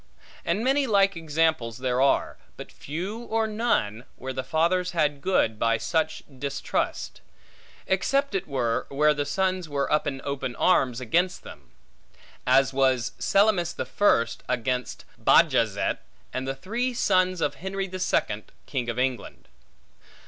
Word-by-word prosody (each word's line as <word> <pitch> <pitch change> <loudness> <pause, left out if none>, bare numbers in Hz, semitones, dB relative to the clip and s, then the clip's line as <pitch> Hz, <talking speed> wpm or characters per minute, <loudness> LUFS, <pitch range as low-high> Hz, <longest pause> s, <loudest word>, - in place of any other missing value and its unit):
And 190 +6 0
many 270 +2 +2
like 195 -3 +3
examples 160 -7 0
there 130 0 0
are; 135 - +2 0.2
but - - -9
few 180 +10 -5
or 225 0 0
none, 210 - -1
where 130 0 -6
the 130 - -3
fathers 180 +4 +1
had 150 -4 +1
good 110 - +1
by 115 -1 +2
such 155 +8 -1 0.2
distrust; 140 +1 -3 0.6
except 275 +8 +1
it 195 -1 -2
were, 125 -4 -1
where 150 +2 +3
the 145 -1 -2
sons 185 +1 -1
were 140 0 -1
up 150 - +2
in 135 -2 -3
open 135 -3 -3
arms 130 -8 +2
against 175 +10 0
them; - - -12 0.8
as 135 +1 +4
was 130 -3 +2
Selymus 195 -4 +2
the - - -4
First 115 -13 +2
against 125 0 -2 0.2
Bajazet; - - +3 0.3
and 130 +1 -3
the 135 - -2
three 235 - -2
sons 185 -4 +2
of 145 - 0
Henry 195 +1 -2
the 185 0 -6
Second, 110 - 0 0.2
King 125 -4 -3
of 115 - -3
England. 125 - -3
150 Hz, 145 wpm, -26 LUFS, 130-185 Hz, 0.8 s, as